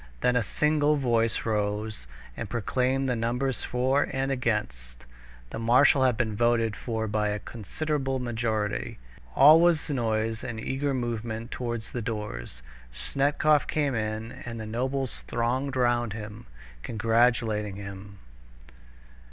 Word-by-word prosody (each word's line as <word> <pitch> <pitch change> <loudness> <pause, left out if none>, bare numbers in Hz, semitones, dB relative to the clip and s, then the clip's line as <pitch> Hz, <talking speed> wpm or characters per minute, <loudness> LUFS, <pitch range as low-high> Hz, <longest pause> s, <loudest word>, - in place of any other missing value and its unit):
Then 125 - +3
a 125 - +3
single 150 +5 +2
voice 115 -5 +1
rose 105 - -2 0.3
and - - -5
proclaimed 130 +3 0
the 125 - +1
numbers 120 +3 -1
for 130 +3 +1
and 135 0 -1
against. 60 - -2 0.5
The - - -5
marshal 125 +4 +5
had 125 -4 +2
been 110 -3 -1
voted 115 -1 +2
for 110 -1 -3
by 105 0 0
a 105 0 -1
considerable 135 +6 -3
majority. 110 -4 -2 0.4
All 150 +4 +8
was 165 -3 +3
noise 110 -3 -1
and 115 -2 -5
eager 135 +4 -1
movement 115 -1 -3
towards 120 -3 -4
the 120 - -3
doors. 105 - -5 0.3
Snetkov 140 - +1
came 145 -3 0
in, 110 0 -3
and 115 -1 -6
the 110 - -5
nobles 130 +4 -2
thronged 130 +4 -1
round 120 -3 +1
him, 105 - -8 0.3
congratulating 110 - +1
him. 100 0 -9
115 Hz, 130 wpm, -27 LUFS, 110-130 Hz, 0.5 s, All